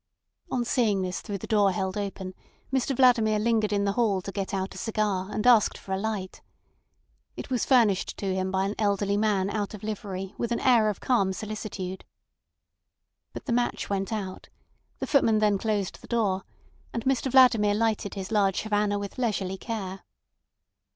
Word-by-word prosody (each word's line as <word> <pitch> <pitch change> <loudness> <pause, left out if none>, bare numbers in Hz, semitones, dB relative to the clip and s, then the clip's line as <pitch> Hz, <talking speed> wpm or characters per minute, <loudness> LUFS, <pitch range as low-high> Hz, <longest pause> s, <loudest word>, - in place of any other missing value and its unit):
On 245 -2 -1
seeing 215 -6 +1
this 185 0 -3
through 205 -3 -4
the - - -8
door 205 -3 +3
held 190 0 -2
open, 195 -2 -4 0.4
Mr 270 +1 +1
Vladimir 235 -4 +4
lingered 215 -1 +1
in 200 -1 +1
the 200 - +2
hall 205 -3 +1
to 195 - -5
get 195 -1 -3
out 190 -1 -2
a - - -10
cigar 210 -4 -1
and 210 +1 -2
asked 240 -4 +5
for 190 - -10
a 190 - -1
light. 200 -3 -4 1.0
It - - -7
was 250 -3 +1
furnished 225 -8 +3
to 195 -2 -2
him 185 0 -1
by 190 0 0
an 200 - -2
elderly 200 -1 +1
man 205 -2 +1
out 210 0 -3
of 210 - -12
livery 195 -3 -5
with 235 - -2
an 235 - +1
air 235 -4 +4
of 205 - -4
calm 200 -7 +2
solicitude. 200 -2 -5 1.3
But - - -8
the - - -1
match 240 -3 -1
went 195 +2 -1
out; 195 -4 -5 0.5
the - - -3
footman 230 -6 +3
then 210 -2 +2
closed 205 -3 -2
the - - -13
door, 205 -5 0 0.5
and 230 - -4
Mr 265 0 +1
Vladimir 230 -6 +5
lighted 220 -2 0
his 195 +1 -5
large 200 -3 +2
Havana 210 -1 +1
with 200 +4 -6
leisurely 195 -5 -1
care. 195 -5 -5
210 Hz, 180 wpm, -27 LUFS, 195-225 Hz, 1.3 s, asked